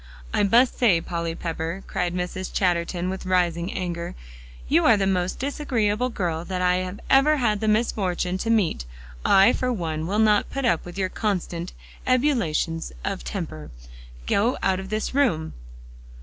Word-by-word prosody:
"I -, -, +2 dB
must 235 Hz, +6 st, +4 dB
say, 210 Hz, -9 st, +4 dB
Polly 170 Hz, -1 st, -3 dB
Pepper," 165 Hz, +2 st, -4 dB
cried 180 Hz, 0 st, -2 dB
Mrs. 180 Hz, +1 st, -3 dB
Chatterton 175 Hz, -1 st, 0 dB
with 190 Hz, -, -5 dB
rising 175 Hz, -1 st, +1 dB
anger, 170 Hz, -2 st, -4 dB, 0.5 s
"you 170 Hz, -, +3 dB
are 225 Hz, -3 st, +6 dB
the 195 Hz, -, +1 dB
most 185 Hz, -1 st, 0 dB
disagreeable 250 Hz, -5 st, 0 dB
girl 170 Hz, -7 st, -2 dB
that 185 Hz, +1 st, -4 dB
I 180 Hz, 0 st, +1 dB, 0.2 s
ever 295 Hz, +3 st, +5 dB
had 215 Hz, -6 st, +1 dB
the 220 Hz, -, -2 dB
misfortune 190 Hz, -5 st, 0 dB
to 225 Hz, -, -2 dB
meet. 195 Hz, -, +1 dB, 0.4 s
I, 195 Hz, +5 st, +6 dB
for 255 Hz, 0 st, -1 dB
one, 160 Hz, -7 st, -3 dB
will 200 Hz, +3 st, -1 dB
not 215 Hz, -1 st, +3 dB
put 275 Hz, -1 st, -3 dB
up 170 Hz, -7 st, +1 dB
with 175 Hz, +1 st, -9 dB
your 190 Hz, -1 st, 0 dB
constant 180 Hz, -4 st, -3 dB, 0.3 s
ebullitions 235 Hz, -, +1 dB
of -, -, -3 dB
temper. 75 Hz, +5 st, -5 dB, 0.6 s
Go 225 Hz, +5 st, +1 dB
out 190 Hz, -1 st, +2 dB
of 190 Hz, 0 st, -7 dB
this 215 Hz, +3 st, -2 dB
room!" 230 Hz, -, +1 dB
185 Hz, 160 wpm, -24 LUFS, 170-220 Hz, 0.6 s, are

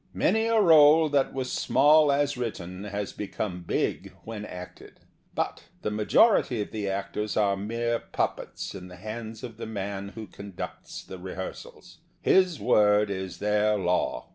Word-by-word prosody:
Many 220 Hz, +1 st, +2 dB
a 230 Hz, -1 st, +3 dB
role 160 Hz, -4 st, +7 dB
that 140 Hz, -2 st, +2 dB
was 130 Hz, -1 st, -3 dB
small 150 Hz, +3 st, +4 dB
as 145 Hz, 0 st, +1 dB
written 100 Hz, -6 st, -5 dB
has 100 Hz, 0 st, -4 dB
become 95 Hz, -2 st, -4 dB
big 85 Hz, -, -2 dB
when 110 Hz, -2 st, -6 dB
acted. 90 Hz, -2 st, -11 dB, 0.3 s
But -, -, -2 dB, 0.2 s
the 105 Hz, -, -1 dB
major 110 Hz, -, +5 dB
ity 120 Hz, -, -2 dB
of -, -, -12 dB
tbe 105 Hz, -2 st, -3 dB
actors 100 Hz, +2 st, -3 dB
are 100 Hz, -2 st, +3 dB
mere 115 Hz, +4 st, -2 dB
puppets -, -, -3 dB
in 90 Hz, -2 st, -8 dB
the 90 Hz, -, -11 dB
hands 110 Hz, +4 st, -7 dB
of 115 Hz, -3 st, -8 dB
the 115 Hz, -1 st, -6 dB
man 100 Hz, -2 st, -4 dB
who 110 Hz, -1 st, -6 dB
conducts 100 Hz, -1 st, -8 dB
the 95 Hz, -, -9 dB
re 95 Hz, +1 st, -7 dB
hearsals. 95 Hz, -, -8 dB, 0.2 s
His 185 Hz, -5 st, +3 dB
word 105 Hz, 0 st, +4 dB
is 95 Hz, -1 st, -5 dB
their 105 Hz, +1 st, +2 dB
law. 90 Hz, -9 st, -1 dB
105 Hz, 165 wpm, -27 LUFS, 100-125 Hz, 0.3 s, role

